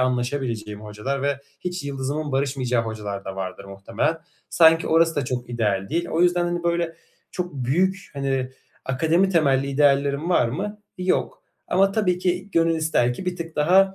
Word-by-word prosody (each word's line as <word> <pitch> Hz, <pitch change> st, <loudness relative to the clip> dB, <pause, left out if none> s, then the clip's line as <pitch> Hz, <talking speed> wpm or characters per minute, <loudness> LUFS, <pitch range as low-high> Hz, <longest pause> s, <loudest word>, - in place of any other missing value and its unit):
anlaşabileceğim 125 Hz, -4 st, -1 dB
hocalar 110 Hz, +6 st, -4 dB
ve 140 Hz, 0 st, 0 dB, 0.2 s
hiç 180 Hz, -3 st, -4 dB
yıldızımın 140 Hz, +2 st, -3 dB
barışmayacağı 130 Hz, -3 st, 0 dB
hocalar 105 Hz, -3 st, -5 dB
da 95 Hz, 0 st, -6 dB
vardır 95 Hz, 0 st, -5 dB
muhtemelen. 100 Hz, +11 st, -2 dB, 0.3 s
Sanki 165 Hz, -1 st, +5 dB
orası 165 Hz, 0 st, +3 dB
da 140 Hz, -, 0 dB
çok 125 Hz, -1 st, -4 dB
ideal 105 Hz, -5 st, 0 dB
değil. 170 Hz, +4 st, -1 dB
O 165 Hz, -, 0 dB
yüzden 175 Hz, -1 st, +2 dB
böyle 170 Hz, -1 st, 0 dB, 0.3 s
çok 180 Hz, -3 st, -4 dB
büyük, 180 Hz, +10 st, 0 dB
hani 135 Hz, -2 st, -1 dB, 0.3 s
akademi 160 Hz, +8 st, +2 dB
temelli 140 Hz, -6 st, +2 dB
ideallerim 140 Hz, +3 st, +2 dB
var 120 Hz, -9 st, +3 dB
mı? 205 Hz, -, -4 dB, 0.2 s
Yok 185 Hz, 0 st, -1 dB, 0.3 s
ama 195 Hz, +2 st, +3 dB
tabii 180 Hz, -5 st, +1 dB
ki 180 Hz, +2 st, -1 dB
gönül 165 Hz, -2 st, +3 dB
ister 155 Hz, -6 st, +2 dB
ki 185 Hz, -, -8 dB
bir 180 Hz, -1 st, -1 dB
tık 165 Hz, -1 st, -7 dB
daha, 190 Hz, +5 st, +4 dB
145 Hz, 160 wpm, -23 LUFS, 125-175 Hz, 0.3 s, Sanki